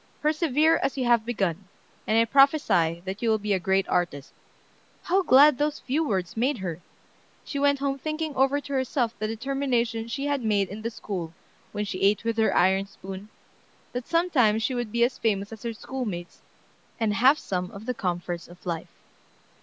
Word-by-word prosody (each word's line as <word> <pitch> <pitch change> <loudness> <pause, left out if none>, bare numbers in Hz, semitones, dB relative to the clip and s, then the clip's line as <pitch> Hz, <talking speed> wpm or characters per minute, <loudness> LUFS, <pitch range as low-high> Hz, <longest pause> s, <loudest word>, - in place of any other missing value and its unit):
Persevere 310 +1 +2
as 275 - -1
you 255 - 0
have 235 -2 +3
begun, 195 -5 -1 0.4
and 220 - +2
I 230 - +5
prophesy 230 - +3
that 190 +2 -5
you 235 - +1
will 220 - +3
be 210 -1 -1
a 190 - +1
great 190 +2 +1
artist." 155 -5 -1 0.7
How 375 +3 +2
glad 290 -4 +6
those 295 0 0
few 285 +5 -1
words 190 - -2
made 250 +4 +1
her! 180 -4 -5 0.6
She 280 - -4
went 285 0 +3
home 275 0 -2
thinking 310 +1 -3
over 270 +2 +3
to 280 0 -8
herself 255 -3 0
the 215 - -1
determination 235 -1 -1
she 275 +4 -3
had 285 -3 -1
made 205 -3 +1
in 210 +2 -7
the 230 - -2
school 180 -7 -6 0.4
when 210 0 -3
she 190 -2 -5
ate 200 +3 +3
with 230 0 -1
her 220 - +2
iron 190 +2 +3
spoon, 195 +1 -9 0.6
that 245 -1 -4
sometime 310 -11 +3
she 225 +4 -1
would 240 -3 -3
be 235 +1 +2
as 245 - 0
famous 200 -1 -1
as 220 - -10
her 235 - -3
schoolmates, 215 -7 -6 0.6
and 220 -2 +1
have 260 +8 +5
some 180 -8 -3
of 200 +3 -10
the 250 - -1
comforts 175 -4 -3
of 175 +1 -16
life. 170 -2 -4
230 Hz, 190 wpm, -26 LUFS, 195-275 Hz, 0.7 s, glad